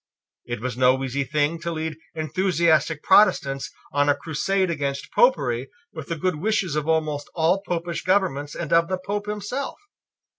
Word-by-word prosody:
It 120 Hz, -2 st, -5 dB
was 125 Hz, -1 st, -3 dB
no 130 Hz, +1 st, +3 dB
easy 135 Hz, +1 st, -1 dB
thing 150 Hz, +4 st, 0 dB
to 170 Hz, +1 st, -4 dB
lead 160 Hz, -1 st, -3 dB, 0.2 s
enthusiastic 160 Hz, -2 st, +1 dB
Protestants 140 Hz, -9 st, +4 dB, 0.2 s
on 145 Hz, 0 st, +2 dB
a 145 Hz, -, +4 dB
crusade 185 Hz, +4 st, -1 dB
against 140 Hz, -3 st, -3 dB
Popery 135 Hz, -, +2 dB, 0.2 s
with -, -, -7 dB
the 165 Hz, -, -2 dB
good 180 Hz, +1 st, -1 dB
wishes 190 Hz, -3 st, 0 dB
of 150 Hz, 0 st, -1 dB
almost 155 Hz, -2 st, 0 dB
all 170 Hz, +4 st, +2 dB
Popish 170 Hz, -2 st, -3 dB
governments 185 Hz, -7 st, 0 dB
and 170 Hz, -, -3 dB
of 165 Hz, 0 st, +4 dB
the 185 Hz, +1 st, -1 dB
Pope 205 Hz, +3 st, -4 dB
himself. 210 Hz, +6 st, -4 dB
160 Hz, 160 wpm, -24 LUFS, 145-185 Hz, 0.2 s, Protestants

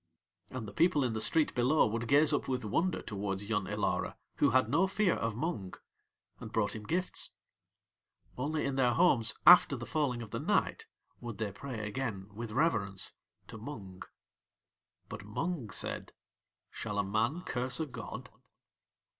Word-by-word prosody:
And 130 Hz, -4 st, -6 dB
the 100 Hz, -, -9 dB
people 160 Hz, -, +3 dB
in 120 Hz, -3 st, 0 dB
the 110 Hz, -, -2 dB
street 155 Hz, +6 st, +3 dB
below 130 Hz, +5 st, +3 dB
would 115 Hz, +2 st, -2 dB
gaze 145 Hz, +3 st, +6 dB
up -, -, 0 dB
with 125 Hz, -3 st, -2 dB
wonder 170 Hz, -, 0 dB
towards 100 Hz, -1 st, -3 dB
Yun 105 Hz, -3 st, -1 dB
Ilara, -, -, -1 dB, 0.2 s
who 145 Hz, -, +4 dB
had 130 Hz, -1 st, +3 dB
no 165 Hz, +10 st, +3 dB
fear 195 Hz, -1 st, +2 dB
of 115 Hz, -2 st, -2 dB
Mung, 115 Hz, -, -3 dB, 0.6 s
and 110 Hz, -, -8 dB
brought 110 Hz, -1 st, 0 dB
him 105 Hz, -1 st, -8 dB
gifts; 180 Hz, +2 st, -1 dB, 1.1 s
only 150 Hz, +4 st, -1 dB
in 135 Hz, -1 st, -2 dB
their 125 Hz, -2 st, +3 dB
homes 120 Hz, -10 st, +3 dB
after 175 Hz, -5 st, +8 dB
the 120 Hz, -2 st, -6 dB
falling 130 Hz, -6 st, -1 dB
of 105 Hz, -, -11 dB
the -, -, -3 dB
night -, -, 0 dB, 0.3 s
would 120 Hz, -4 st, -7 dB
they 105 Hz, -2 st, -2 dB
pray 110 Hz, 0 st, -6 dB
again 105 Hz, -4 st, -4 dB
with 115 Hz, +1 st, -6 dB
reverence 105 Hz, -, 0 dB, 0.3 s
to 110 Hz, -, -9 dB
Mung. 100 Hz, -7 st, -8 dB, 1.1 s
But -, -, -8 dB
Mung 130 Hz, -, -3 dB
said: -, -, -2 dB, 0.6 s
"Shall 105 Hz, -2 st, -5 dB
a 100 Hz, -, +2 dB
man 115 Hz, -, 0 dB
curse 125 Hz, -4 st, -2 dB
a 160 Hz, -, 0 dB
god?" 140 Hz, -, -8 dB
120 Hz, 165 wpm, -32 LUFS, 105-145 Hz, 1.1 s, after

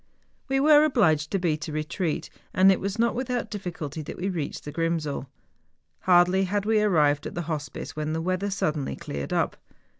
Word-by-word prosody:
obliged 270 Hz, -, +4 dB
to 195 Hz, -, 0 dB
beat 165 Hz, -3 st, -1 dB
a -, -, -5 dB
retreat, 155 Hz, +2 st, -2 dB, 0.2 s
and 190 Hz, +1 st, +7 dB
it 190 Hz, -, +1 dB
was 195 Hz, +2 st, -3 dB
not 235 Hz, +1 st, +2 dB
without 250 Hz, -1 st, -2 dB
difficulty 165 Hz, -7 st, -5 dB
that 150 Hz, -, -7 dB
we 190 Hz, +2 st, -2 dB
reached 160 Hz, -6 st, -4 dB
the 150 Hz, -, -5 dB
Grrimsel. 160 Hz, -3 st, -2 dB, 0.7 s
Hardly 180 Hz, +1 st, +4 dB
had 200 Hz, +2 st, -1 dB
we 215 Hz, 0 st, +3 dB
arrived 150 Hz, -8 st, +3 dB
at -, -, -8 dB
the 175 Hz, -, -2 dB
hospice 155 Hz, -2 st, -5 dB
when 155 Hz, 0 st, -2 dB
the 160 Hz, -, -1 dB
weather 185 Hz, +4 st, -1 dB
suddenly 155 Hz, -7 st, -1 dB
cleared 70 Hz, -1 st, -6 dB
up. -, -, 0 dB
175 Hz, 175 wpm, -26 LUFS, 155-200 Hz, 0.7 s, and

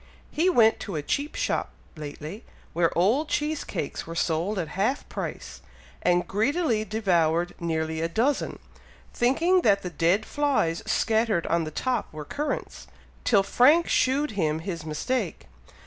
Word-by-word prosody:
He 340 Hz, +5 st, +2 dB
went 225 Hz, -9 st, +4 dB
to 195 Hz, -, -5 dB
a 150 Hz, -, -2 dB
cheap 285 Hz, -, -2 dB
shop -, -, -1 dB, 0.3 s
lately, 155 Hz, +6 st, -7 dB, 0.3 s
where 170 Hz, 0 st, +3 dB
old 235 Hz, -, +2 dB
cheese 300 Hz, 0 st, -1 dB
cakes -, -, -5 dB
were 165 Hz, -, -6 dB
sold 170 Hz, +5 st, 0 dB
at 165 Hz, -4 st, -2 dB
half 215 Hz, -, -1 dB
price, -, -, -6 dB, 0.4 s
and 175 Hz, 0 st, +2 dB
greedily 230 Hz, -, +1 dB
devoured 175 Hz, -6 st, +1 dB
nearly 160 Hz, -1 st, -2 dB
a 165 Hz, -, 0 dB
dozen, 250 Hz, +11 st, 0 dB, 0.6 s
thinking 330 Hz, +10 st, +3 dB
that 200 Hz, -8 st, +3 dB
the 180 Hz, -, -4 dB
dead 175 Hz, +7 st, +2 dB
flies 275 Hz, -, 0 dB
scattered 220 Hz, -5 st, +1 dB
on 170 Hz, -1 st, +1 dB
the -, -, -4 dB
top 250 Hz, -, -2 dB
were 155 Hz, -1 st, -7 dB
currants, 295 Hz, -, -4 dB, 0.4 s
till 200 Hz, -5 st, +4 dB
Frank 280 Hz, +11 st, +4 dB
shewed 280 Hz, +3 st, +2 dB
him 160 Hz, -7 st, 0 dB
his 170 Hz, -3 st, -5 dB
mistake!" 195 Hz, -, -2 dB
200 Hz, 150 wpm, -26 LUFS, 165-260 Hz, 0.6 s, went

